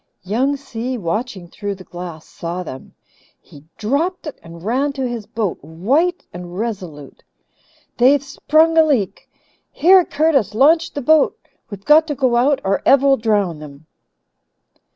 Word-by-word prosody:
Young 255 +9 0
Si, 255 -2 -5
watching 190 0 -4
through 205 +3 -5
the 185 - -13
glass, 175 -3 -9
saw 175 +2 -6
them. 130 -5 -10 0.4
He 145 0 -17
dropped 305 - -1
it 300 - -8
and 165 0 -13
ran 265 +7 0
to 265 -2 -3
his 235 -4 -6
boat, 215 -9 -3
white 260 - 0
and 175 0 -9
resolute. 185 - -6 0.7
"They've 270 +3 +4
sprung 315 +3 +2
a - - +7
leak. 260 -11 -1 0.4
Here, 370 +2 +5
Curtis, 285 - 0
launch 315 +7 +3
the 285 - -4
boat. 310 +3 +3 0.3
We've 200 -2 -10
got 315 +2 +5
to 295 - -3
go 255 -3 +1
out 265 +4 +2
or 195 +1 0
Ev 275 0 +4
will 275 -1 +5
drown 205 -8 0
them." 150 0 -12
235 Hz, 150 wpm, -19 LUFS, 180-285 Hz, 0.7 s, a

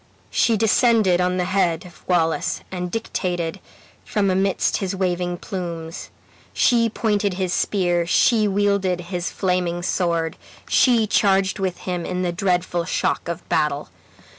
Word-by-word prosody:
She 230 -2 +2
descended 220 -4 +3
on 180 0 +1
the 180 - +1
head 185 -2 0
of 175 - -15
Wallace, 165 -3 +1
and 180 -1 -3
dictated 175 -5 -3 0.4
from 200 -2 0
amidst 190 +1 +1
his 195 -1 -3
waving 180 -1 -1
plumes. 170 -3 -6 0.4
She 230 -2 +3
pointed 205 -3 0
his 185 -1 -1
spear, 175 -4 +1
she 215 +3 +3
wielded 200 -2 +1
his 175 0 -2
flaming 180 -2 -1
sword, 170 -3 -1 0.3
she 235 -4 +4
charged 195 -2 +2
with 185 -2 -2
him 180 -2 -3
in 180 +1 -2
the 175 - 0
dreadful 180 -2 0
shock 170 - -1
of 170 0 -5
battle. 150 -4 0
180 Hz, 140 wpm, -22 LUFS, 175-200 Hz, 0.4 s, she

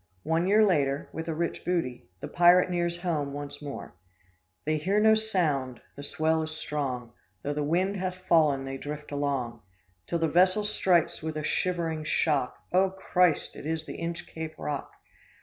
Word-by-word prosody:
One 165 +2 +1
year 215 +2 +5
later, 145 -7 +1
with 160 0 -5
a 160 - -2
rich 170 +1 -2
booty, 145 - -2
the - - -4
pirate 175 +1 +5
nears 175 0 -1
home 150 -6 -1
once 145 0 -6
more, 145 -1 -7 0.7
"They 155 +1 +1
hear 190 +7 +1
no 220 +1 +6
sound, 160 - +1 0.2
the 140 - -8
swell 160 +2 +2
is 155 - -3
strong; 130 -6 -3 0.3
Though 145 - -1
the 150 - -2
wind 180 +7 +1
hath 185 -1 -2
fallen 150 -5 +4
they 135 0 -4
drift 150 +1 -7
along, 135 -5 -2 0.5
Till 170 - 0
the 165 -1 +1
vessel 185 +5 +4
strikes 185 -5 +2
with 160 0 -4
a 155 - -3
shivering 165 -2 -1
shock, 150 -4 0 0.2
'Oh, 190 +1 +4
Christ! 180 -3 +1
it - - -7
is 160 0 -2
the - - -7
Inchcape 165 -1 -5
Rock! 145 -2 -4
160 Hz, 170 wpm, -28 LUFS, 145-180 Hz, 0.7 s, no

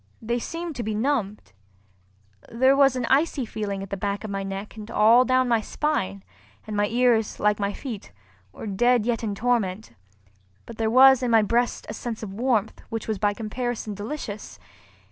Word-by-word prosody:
They 235 +2 -2
seemed 335 +4 -5
to - - -2
be 215 -1 -3
numbed. 215 - -2 1.0
There 260 +4 +4
was 275 -2 +4
an 250 -2 -1
icy 275 0 +2
feeling 205 -3 -4
at 195 - -10
the - - -1
back 200 +2 -3
of 215 - -5
my 195 0 -2
neck 195 +2 -6
and 215 0 -9
all 230 +3 +5
down 255 0 +2
my 230 -2 +2
spine, 100 - -2 0.4
and 215 - -5
my 205 0 +2
ears, 235 -2 +1
like 210 0 +2
my 200 0 0
feet, 225 -2 -7 0.4
were - - -9
dead 235 +3 +2
yet 235 -1 -1
in 210 -2 -2
torment; 220 -3 -1 0.7
but 230 - -11
there 220 -1 +1
was 260 +2 +7
in 250 - 0
my 225 -2 +5
breast 235 +3 0
a - - -5
sense 225 0 -5
of 195 -3 -6
warmth 225 -1 0
which 225 0 -5
was 215 -3 -2
by 205 0 +1
comparison 230 0 -4
delicious. 210 0 -6
225 Hz, 185 wpm, -25 LUFS, 205-245 Hz, 1.0 s, was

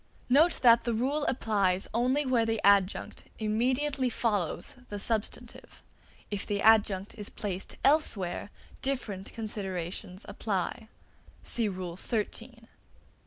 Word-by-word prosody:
Note 310 +7 +5
that 235 -1 +7
the 235 -1 0
rule 280 +6 0
applies 200 -6 +1
only 255 +5 +2
where 250 -3 +3
the 225 -1 0
adjunct 200 -1 +3
immediately 255 +5 +1
follows 210 -8 -1 0.2
the 205 - -4
substantive. 220 +1 -3 0.5
If 205 -1 -2
the 205 -1 -2
adjunct 210 -2 +4
is 205 - -5
placed 195 -3 -5
elsewhere, 210 - +1 0.3
different 220 -8 -3
considerations 190 -3 -5
apply. 215 +2 -3 0.6
See 230 -3 +1
Rule 180 -2 -5
XIII. 215 +1 0
(3). 230 0 -8
220 Hz, 120 wpm, -29 LUFS, 195-245 Hz, 0.6 s, that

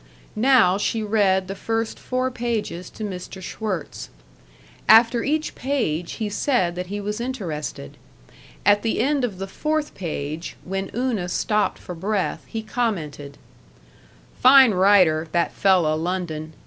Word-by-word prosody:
Now 215 -5 +4
she 220 +1 -1
read 200 -3 +2
the 195 - -4
first 225 +2 -3
four 255 0 -2
pages 230 -7 -3
to 220 - -9
Mr. 190 -2 -6
Schwirtz. 185 -3 -5 0.8
After 230 +2 +6
each 310 +2 -1
page 225 - -2
he 220 - -3
said 205 -4 0
that 180 +1 -5
he 205 +2 -4
was 210 +2 -4
interested. 165 - -5 0.7
At 205 0 +5
the 225 - -1
end 275 +3 +1
of 215 -7 -2
the 195 - -4
fourth 305 +9 -2
page, 155 -2 -5
when 195 +1 -4
Una 235 -8 -1
stopped 210 +3 0
for 180 - -8
breath, 195 +3 -2
he 225 -1 -5
commented: 160 - -3 1.0
"Fine 260 -1 +8
writer, 180 -5 +4
that 170 -1 +1
fella 185 -6 +3
London. 160 -2 -3
205 Hz, 135 wpm, -23 LUFS, 175-235 Hz, 1.0 s, Fine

